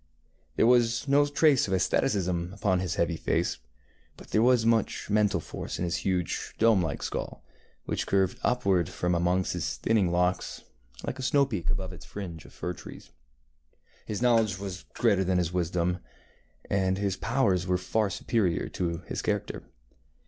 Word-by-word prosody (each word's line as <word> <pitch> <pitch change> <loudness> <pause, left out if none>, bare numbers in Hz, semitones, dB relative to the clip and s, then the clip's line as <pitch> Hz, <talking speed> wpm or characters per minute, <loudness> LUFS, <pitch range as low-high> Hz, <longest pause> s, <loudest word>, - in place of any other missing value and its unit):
There - - +3
was 120 +2 +3
no 145 +1 +4
trace 145 -3 +3
of 95 - +1
asceticism 90 -1 0
upon 95 -2 +1
his 90 -2 -2
heavy 85 -1 0
face, - - -1 0.6
but - - -14
there 110 - +2
was 120 -1 +4
much 115 -2 +1
mental 105 -4 +3
force - - -6
in 90 - -1
his 85 - -1
huge 90 -3 -2
dome 110 -4 +4
like 80 -4 -3
skull, - - -4 0.4
which - - -2
curved 95 -2 +1
upward 100 -9 +1
from 90 0 -1
amongst 90 +2 +1
his 85 -3 -3
thinning 105 -6 +2
locks, 90 +1 0 0.4
like 130 - -4
a - - -3
snow 140 +2 +3
peak 100 - -3
above 95 -1 -2
its 90 - -11
fringe 85 -6 -7
of - - -14
fir 90 - -4
trees. - - -12 1.0
His 105 +2 -3
knowledge 115 -5 +3
was 100 0 -6
greater 100 -5 +3
than 95 0 +1
his 90 -1 0
wisdom, 90 0 0 0.7
and 95 -1 +1
his 100 -2 -1
powers 100 -6 +1
were 90 0 +2
far 100 +4 0
superior 95 -2 0
to 85 -1 -3
his - - -4
character. - - -2
95 Hz, 165 wpm, -28 LUFS, 90-110 Hz, 1.0 s, no